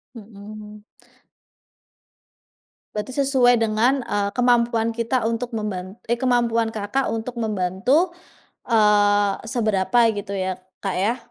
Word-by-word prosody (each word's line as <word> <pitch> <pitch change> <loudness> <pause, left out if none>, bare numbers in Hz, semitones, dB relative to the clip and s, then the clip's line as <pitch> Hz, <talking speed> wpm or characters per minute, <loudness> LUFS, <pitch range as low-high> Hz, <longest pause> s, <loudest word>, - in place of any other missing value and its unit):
Mhm. 210 -1 -11 2.1
Berarti 210 +4 -4
sesuai 250 -4 +3
dengan, 225 +5 +2
eee, 205 -2 -1
kemampuan 235 -2 +2
kita 230 +2 -1
untuk 235 +1 -4
memban 195 -4 -4 0.2
eh, 235 - +2
kemampuan 235 -2 +1
Kakak 215 +6 -1
untuk 225 +2 -5
membantu, 220 - +1 0.6
eee, 205 -3 +4
seberapa 220 -2 0
gitu 205 -1 -5
ya 185 -1 -3 0.2
Kak 195 -2 -1
ya? 205 +6 +1
220 Hz, 105 wpm, -22 LUFS, 205-240 Hz, 2.1 s, eee